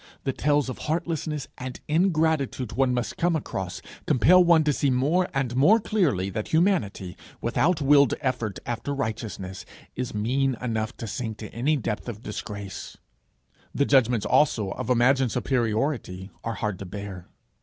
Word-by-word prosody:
The 135 Hz, -, -1 dB
tales 145 Hz, 0 st, +1 dB
of 130 Hz, -, -5 dB
heartlessness 155 Hz, -2 st, -2 dB
and 130 Hz, 0 st, -6 dB
ingratitude 155 Hz, -, +1 dB
one 130 Hz, +2 st, +2 dB
must 120 Hz, -1 st, -2 dB
come 170 Hz, -1 st, +2 dB
across, 95 Hz, -, -4 dB, 0.2 s
compel 180 Hz, +9 st, +6 dB
one 170 Hz, -2 st, +5 dB
to 150 Hz, -1 st, +2 dB
see 140 Hz, -, +1 dB
more 150 Hz, +9 st, +2 dB
and 135 Hz, -3 st, -1 dB
more 175 Hz, -, +5 dB
clearly 145 Hz, -, 0 dB
that 105 Hz, +2 st, -3 dB
humanity, 160 Hz, -, +1 dB, 0.2 s
without 165 Hz, 0 st, +1 dB
willed 140 Hz, 0 st, +5 dB
effort 120 Hz, -7 st, -2 dB
after 120 Hz, +4 st, -3 dB
righteousness, 110 Hz, -7 st, -4 dB, 0.3 s
is 125 Hz, -3 st, -4 dB
mean 130 Hz, +4 st, 0 dB
enough 110 Hz, -3 st, -3 dB
to -, -, -6 dB
sink 110 Hz, 0 st, -4 dB
to 105 Hz, -, -8 dB
any 145 Hz, +7 st, +1 dB
depth 110 Hz, -2 st, -3 dB
of 110 Hz, 0 st, -8 dB
disgrace. 100 Hz, -2 st, -7 dB, 0.8 s
The 140 Hz, -, +2 dB
judgments 125 Hz, -5 st, +3 dB
also 110 Hz, -9 st, +2 dB
of -, -, -5 dB
imagined 125 Hz, 0 st, +3 dB
superiority 115 Hz, -5 st, -1 dB
are 115 Hz, -1 st, -3 dB
hard 105 Hz, -3 st, -3 dB
to 100 Hz, -, -6 dB
bear. 95 Hz, -2 st, -7 dB
125 Hz, 155 wpm, -25 LUFS, 110-150 Hz, 0.8 s, compel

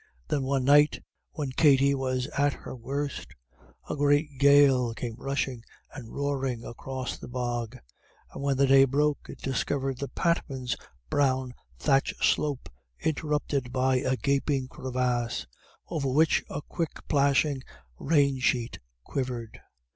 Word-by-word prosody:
Then, 145 Hz, -, +1 dB
one 135 Hz, 0 st, 0 dB
night, 145 Hz, +2 st, +5 dB, 0.3 s
when 145 Hz, -4 st, -3 dB
Katty 140 Hz, -1 st, +4 dB
was 130 Hz, -2 st, -1 dB
at 145 Hz, 0 st, +2 dB
her -, -, -9 dB
worst, 130 Hz, -, -4 dB, 0.5 s
a -, -, -3 dB
great 145 Hz, -1 st, +1 dB
gale 140 Hz, -4 st, +5 dB
came 120 Hz, -1 st, -4 dB
rushing 135 Hz, -2 st, -3 dB, 0.3 s
and 125 Hz, -6 st, -9 dB
roaring 135 Hz, -4 st, -2 dB
across 130 Hz, +1 st, -5 dB
the -, -, -9 dB
bog, 120 Hz, -1 st, -3 dB, 0.6 s
and -, -, -7 dB
when 140 Hz, -1 st, +1 dB
the 140 Hz, -, +4 dB
day 135 Hz, 0 st, +7 dB
broke 145 Hz, +2 st, 0 dB
it -, -, -8 dB
discovered 135 Hz, 0 st, -2 dB
the 140 Hz, -, -3 dB
Patmans' 135 Hz, -7 st, -1 dB, 0.4 s
brown 130 Hz, -3 st, +1 dB, 0.2 s
thatch 135 Hz, -, +2 dB
slope 145 Hz, -4 st, +1 dB, 0.3 s
interrupted 150 Hz, -4 st, -1 dB
by 130 Hz, 0 st, +2 dB
a 130 Hz, 0 st, 0 dB
gaping 140 Hz, -1 st, 0 dB
crevasse, 125 Hz, -2 st, -2 dB, 0.4 s
over 140 Hz, -5 st, -2 dB
which 155 Hz, +5 st, +3 dB
a 145 Hz, -, -5 dB
quick 165 Hz, -3 st, -5 dB
plashing 140 Hz, -1 st, +2 dB, 0.4 s
rain 140 Hz, -3 st, +2 dB
sheet 125 Hz, -2 st, 0 dB, 0.2 s
quivered. 125 Hz, -, -4 dB
135 Hz, 130 wpm, -28 LUFS, 125-145 Hz, 0.6 s, day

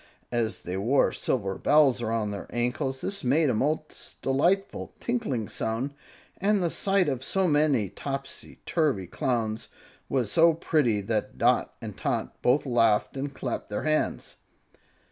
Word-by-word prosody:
As 115 Hz, -2 st, -1 dB
they 90 Hz, +2 st, -4 dB
wore 120 Hz, +8 st, +3 dB
silver 100 Hz, -7 st, -2 dB
bells 140 Hz, -4 st, +4 dB
around 110 Hz, -2 st, -1 dB
their 100 Hz, -2 st, -6 dB
ankles, 130 Hz, +3 st, -1 dB
this 200 Hz, 0 st, -3 dB
made 140 Hz, +3 st, +3 dB
a -, -, 0 dB
most 150 Hz, +7 st, -3 dB
delightful, 175 Hz, +9 st, 0 dB
tinkling 215 Hz, -, -2 dB
sound, 115 Hz, +6 st, -3 dB, 0.4 s
and 200 Hz, 0 st, +2 dB
the 170 Hz, -, 0 dB
sight 195 Hz, -2 st, +1 dB
of 130 Hz, -3 st, -2 dB
so 190 Hz, +4 st, +1 dB
many 145 Hz, -, +3 dB
topsy 135 Hz, +7 st, -6 dB
turvy 145 Hz, -, +1 dB
Clowns 110 Hz, +3 st, -2 dB, 0.4 s
was 125 Hz, -6 st, 0 dB
so 165 Hz, 0 st, +5 dB
pretty 140 Hz, -10 st, +1 dB
that 105 Hz, +2 st, -2 dB
Dot -, -, +2 dB
and -, -, -6 dB
Tot -, -, -3 dB
both 130 Hz, +5 st, +3 dB
laughed 115 Hz, -4 st, +2 dB
and 140 Hz, +1 st, -3 dB
clapped 130 Hz, -3 st, -4 dB
their 105 Hz, -, -3 dB
hands. 155 Hz, 0 st, -1 dB
135 Hz, 145 wpm, -27 LUFS, 115-155 Hz, 0.4 s, so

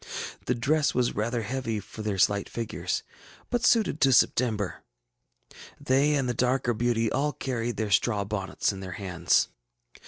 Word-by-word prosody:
The 125 Hz, -, +2 dB
dress 145 Hz, +5 st, +1 dB
was 125 Hz, -1 st, +1 dB
rather 115 Hz, +2 st, -1 dB
heavy 115 Hz, -1 st, -2 dB
for 105 Hz, +2 st, -10 dB
their 105 Hz, -2 st, -2 dB
slight 100 Hz, +2 st, +2 dB
figures, 115 Hz, -2 st, -3 dB, 0.5 s
but 240 Hz, -1 st, 0 dB
suited 220 Hz, -9 st, +3 dB
to 135 Hz, -, +5 dB
September. 115 Hz, -5 st, +2 dB, 1.0 s
They 140 Hz, +3 st, +2 dB
and 135 Hz, -3 st, 0 dB
the 125 Hz, -, 0 dB
darker 125 Hz, 0 st, +1 dB
beauty 115 Hz, -1 st, 0 dB
all 145 Hz, +2 st, 0 dB
carried 120 Hz, -2 st, -3 dB
their 110 Hz, -2 st, -2 dB
straw 100 Hz, 0 st, +2 dB
bonnets 100 Hz, 0 st, -2 dB
in 95 Hz, -, -8 dB
their 95 Hz, -1 st, -6 dB
hands. 90 Hz, -3 st, +1 dB
120 Hz, 155 wpm, -27 LUFS, 105-130 Hz, 1.0 s, to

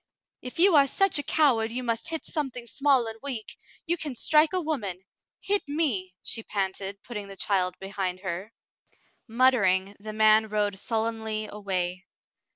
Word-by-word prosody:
"If 250 Hz, -, -8 dB
you 360 Hz, 0 st, +6 dB
are 280 Hz, -2 st, +6 dB
such 390 Hz, +2 st, +3 dB
a 290 Hz, -, -5 dB
coward 240 Hz, -8 st, +3 dB
you 250 Hz, +2 st, -3 dB
must 235 Hz, +6 st, -1 dB
hit 320 Hz, -1 st, -3 dB
something 265 Hz, -7 st, -3 dB
small 265 Hz, +1 st, +2 dB
and 225 Hz, 0 st, -7 dB
weak, 255 Hz, -6 st, -5 dB, 0.3 s
you 345 Hz, 0 st, 0 dB
can 300 Hz, -5 st, -4 dB
strike 305 Hz, +5 st, +4 dB
a 370 Hz, -, +1 dB
woman. 210 Hz, -, -3 dB, 0.4 s
Hit 410 Hz, 0 st, +2 dB
me," 250 Hz, -, -1 dB
she 225 Hz, -, -2 dB
panted, 195 Hz, -1 st, -3 dB
putting 210 Hz, -4 st, -6 dB
the 195 Hz, 0 st, -10 dB
child 185 Hz, -2 st, 0 dB
behind 195 Hz, -2 st, -4 dB
her. 190 Hz, +3 st, -5 dB, 0.8 s
Muttering, 205 Hz, -6 st, +3 dB
the 215 Hz, +1 st, -7 dB
man 215 Hz, 0 st, +4 dB
rode 205 Hz, -2 st, 0 dB
sullenly 220 Hz, -1 st, -2 dB
away. 185 Hz, -2 st, -3 dB
220 Hz, 160 wpm, -27 LUFS, 195-275 Hz, 0.8 s, you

